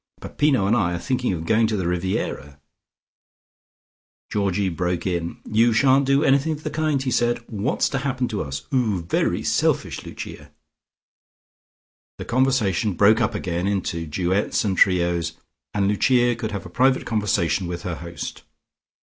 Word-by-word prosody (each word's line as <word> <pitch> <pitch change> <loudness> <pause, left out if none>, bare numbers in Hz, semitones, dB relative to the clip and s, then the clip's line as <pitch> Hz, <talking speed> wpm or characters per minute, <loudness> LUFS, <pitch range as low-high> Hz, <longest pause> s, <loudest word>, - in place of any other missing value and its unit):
Peppino 140 -9 +1
and 105 +4 +3
I 90 -6 +1
are - - -2
thinking 125 +5 -1
of 80 -3 -4
going 110 +5 +3
to 110 -1 -1
the 95 - -2
Riviera 90 +5 -3 0.8
" - - -52
Georgie 100 -2 0
broke 90 0 -2
in. 85 -2 -2
"You 115 +2 +3
shan't 135 +3 +4
do 140 +2 +3
anything 140 +3 +3
of 155 0 -9
the - - -3
kind," 155 -2 0
he 130 - -1
said. 120 0 +2
"What's 105 -3 -1
to 135 - -1
happen 130 -2 -1
to 105 - -2
us? 70 -2 -5
'Oo 110 -9 +1
very 85 - 0
selfish, - - 0
Lucia." 70 +1 -9 1.7
The - - -7
conversation 115 -6 +1
broke 105 +4 +5
up - - 0
again 90 +1 -2
into 85 -4 -2
duets 90 +7 0
and 95 -2 0
trios, 85 -3 +2 0.4
and 100 -1 0
Lucia 120 +4 +3
could 115 -2 -4
have 100 -2 -5
a - - -8
private 130 +6 +2
conversation 100 -5 0
with 85 0 -5
her 90 -3 -4
host. 85 0 -7
105 Hz, 160 wpm, -23 LUFS, 90-125 Hz, 1.7 s, broke